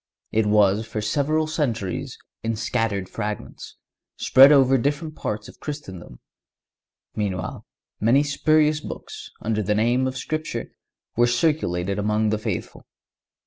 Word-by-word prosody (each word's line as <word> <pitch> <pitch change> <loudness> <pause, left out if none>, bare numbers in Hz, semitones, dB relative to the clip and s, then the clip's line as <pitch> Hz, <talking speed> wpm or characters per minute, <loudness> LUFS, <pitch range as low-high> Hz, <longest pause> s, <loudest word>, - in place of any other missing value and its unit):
It 110 -1 +2
was 105 0 +4
for 110 - -4
several 145 +8 +1
centuries 125 - -2 0.2
in 115 0 -1
scattered 105 -3 -1
fragments, 105 +2 -6 0.4
spread 135 +2 +7
over 135 -2 +5
different 150 +4 -2
parts 105 0 -4
of - - -14
Christendom. 95 - -8 1.0
Meanwhile, 100 -3 -3 0.3
many 120 +7 +4
spurious 150 +1 +2
books, - - -8
under 110 -1 0
the 105 +1 0
name 120 +4 +2
of 130 0 -4
Scripture, 155 +4 -4 0.4
were 120 +1 +4
circulated 105 - 0
among 105 +1 +1
the 105 0 0
faithful. - - -5
115 Hz, 125 wpm, -23 LUFS, 105-145 Hz, 1.0 s, spread